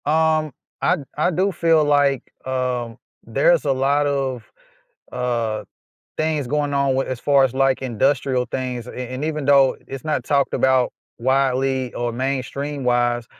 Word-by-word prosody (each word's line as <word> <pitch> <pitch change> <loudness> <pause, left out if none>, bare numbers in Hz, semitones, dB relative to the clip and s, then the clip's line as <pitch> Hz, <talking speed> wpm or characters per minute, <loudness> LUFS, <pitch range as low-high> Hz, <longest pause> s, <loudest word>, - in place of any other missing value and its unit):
Um, 155 0 +2 0.3
I 180 - +3
d 145 - -8
I 155 - +2
do 190 +4 +1
feel 165 -3 +3
like, 145 -3 +2 0.2
um, 125 -3 -2 0.3
there's - - +2
a - - +2
lot 140 +2 +2
of, 135 -5 -2 0.6
uh, 115 -4 -2 0.5
things 155 -4 -1
going 145 +1 -1
on 140 -1 +2
with 135 - 0
as 130 -2 -4
far 140 0 +4
as, 130 -2 +1
like, 135 0 +2
industrial 130 +1 0
things, 125 -2 -4
and - - -9
and 130 +3 -4
even 155 -2 -3
though 140 -2 +5
it's 135 0 -8
not 150 -5 -1
talked 140 +1 +1
about 130 -1 +2 0.3
widely 130 0 +1
or 120 0 -2
mainstream-wise, 130 -2 -1
135 Hz, 150 wpm, -21 LUFS, 125-145 Hz, 0.6 s, though